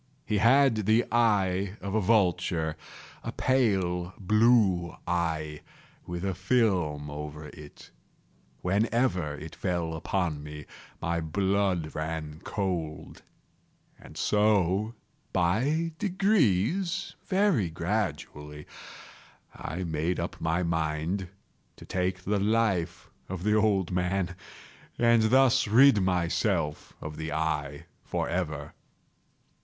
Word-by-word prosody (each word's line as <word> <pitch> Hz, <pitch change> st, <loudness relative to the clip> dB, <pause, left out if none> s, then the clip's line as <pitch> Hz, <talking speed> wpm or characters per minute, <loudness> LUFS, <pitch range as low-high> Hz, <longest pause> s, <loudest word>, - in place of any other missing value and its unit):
He 105 Hz, -6 st, 0 dB
had 115 Hz, -2 st, +4 dB
the 110 Hz, +2 st, +4 dB
eye 100 Hz, -4 st, +2 dB
of 100 Hz, -1 st, -5 dB
a 110 Hz, -, +2 dB
vulture—a 90 Hz, -6 st, -1 dB
pale 95 Hz, -8 st, +1 dB
blue 105 Hz, -4 st, +3 dB
eye, 80 Hz, -3 st, -2 dB, 0.5 s
with 85 Hz, +2 st, -4 dB
a 95 Hz, -, 0 dB
film 90 Hz, -9 st, 0 dB
over 75 Hz, 0 st, -7 dB
it. 75 Hz, -1 st, -13 dB, 0.7 s
Whenever 100 Hz, -, +1 dB
it 80 Hz, +2 st, -9 dB
fell 85 Hz, -3 st, -2 dB
upon 80 Hz, -2 st, -2 dB
me, 75 Hz, 0 st, -9 dB, 0.3 s
my 85 Hz, 0 st, -1 dB
blood 95 Hz, -1 st, 0 dB
ran 80 Hz, 0 st, -4 dB
cold; 80 Hz, -6 st, -4 dB, 0.8 s
and -, -, -13 dB
so 105 Hz, +1 st, +2 dB, 0.4 s
by 135 Hz, -, +1 dB
degrees—very 190 Hz, -, +1 dB
gradually—I 80 Hz, -1 st, -6 dB
made 80 Hz, +1 st, -1 dB
up -, -, -5 dB
my 80 Hz, +2 st, 0 dB
mind 80 Hz, +3 st, -1 dB, 0.5 s
to -, -, -13 dB
take 90 Hz, 0 st, -2 dB
the 100 Hz, +2 st, 0 dB
life 100 Hz, -5 st, 0 dB, 0.2 s
of 95 Hz, -1 st, -5 dB
the 105 Hz, +1 st, +2 dB
old 105 Hz, -4 st, +2 dB
man, 90 Hz, 0 st, -1 dB, 0.6 s
and 115 Hz, -1 st, +4 dB
thus 130 Hz, -2 st, +4 dB
rid 115 Hz, 0 st, +6 dB
myself 85 Hz, -4 st, 0 dB
of 75 Hz, 0 st, -7 dB
the 80 Hz, 0 st, -4 dB
eye 75 Hz, -1 st, -2 dB, 0.2 s
forever. 75 Hz, -5 st, -3 dB
90 Hz, 100 wpm, -28 LUFS, 80-110 Hz, 0.8 s, rid